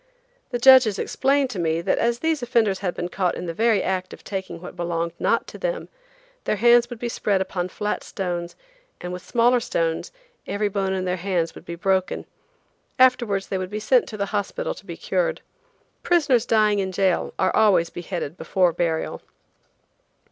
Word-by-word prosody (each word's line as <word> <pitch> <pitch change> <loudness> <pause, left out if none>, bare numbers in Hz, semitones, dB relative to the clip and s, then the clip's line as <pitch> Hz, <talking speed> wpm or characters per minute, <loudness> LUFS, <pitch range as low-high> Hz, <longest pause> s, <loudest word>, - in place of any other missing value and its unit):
The 245 - -1
judges 250 -4 +7
explained 275 -1 +1
to 195 - -5
me 165 -1 0
that 170 - 0
as 235 0 +1
these 320 -3 0
offenders 225 -5 +1
had 180 -3 -2
been 175 - -3
caught 180 0 -1
in - - -5
the 165 - -4
very 220 +1 +2
act 185 -1 -2
of - - -13
taking 190 -4 -5
what 180 - -10
belonged 170 -1 -2
not - - +1
to - - -11
them, - - -3 0.6
their - - +1
hands 240 +2 +5
would 245 - -7
be 240 - -4
spread 205 -4 0
upon 185 -1 -2
flat 210 +3 -3
stones 175 -3 -4 0.4
and 180 0 -6
with 180 0 -7
smaller 245 +1 +3
stones 165 -8 -2 0.4
every 205 0 -1
bone 195 -1 -1
in 185 -1 -2
their 180 0 -1
hands 175 -2 -1
would - - -13
be 170 - -6
broken. 190 0 0 0.7
Afterwards 240 -6 +3
they 190 - -1
would 185 -1 -4
be 210 +2 -4
sent - - +3
to 215 - -7
the 200 - -1
hospital 485 - -2
to - - -15
be - - -7
cured. - - -1 0.6
Prisoners 285 -9 +2
dying 215 -2 +3
in 190 -1 -1
jail 190 -1 0
are 185 - +1
always 190 -6 +4
beheaded 175 -2 -5
before 180 -3 +1
burial. 165 -2 -2
195 Hz, 185 wpm, -23 LUFS, 180-235 Hz, 0.7 s, judges